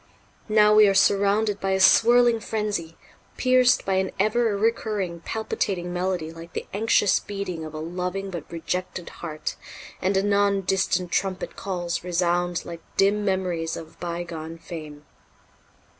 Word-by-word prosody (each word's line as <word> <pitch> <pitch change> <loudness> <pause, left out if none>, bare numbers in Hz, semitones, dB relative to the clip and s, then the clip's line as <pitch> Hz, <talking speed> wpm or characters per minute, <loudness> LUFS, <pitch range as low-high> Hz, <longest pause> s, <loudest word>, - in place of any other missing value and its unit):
Now 210 0 +5
we 215 0 +7
are 195 - +2
surrounded 200 +1 +3
by 195 0 0
a 190 - +1
swirling 235 +4 +5
frenzy, 205 -7 -3 0.4
pierced 255 -1 +4
by 190 -1 +1
an 190 0 0
ever 215 +1 +2
recurring 210 -5 -1
palpitating 180 -2 -3
melody 180 -3 -2
like 165 0 -11
the - - -4
anxious 205 -1 +3
beating 195 -5 -5
of 155 0 -8
a - - -4
loving 180 +4 -4
but 170 -4 -7
rejected 175 +1 -4
heart; 155 -2 -5 0.4
and 190 +1 +1
anon 200 0 +2
distant 185 -1 0
trumpet 190 -1 -2
calls 175 -3 -3
resound 175 0 0
like 170 -1 -8 0.2
dim 205 +2 +3
memories 180 -4 -1
of 160 0 -11
bygone 170 -2 -5
fame." 155 -3 -9
190 Hz, 140 wpm, -24 LUFS, 170-205 Hz, 0.4 s, we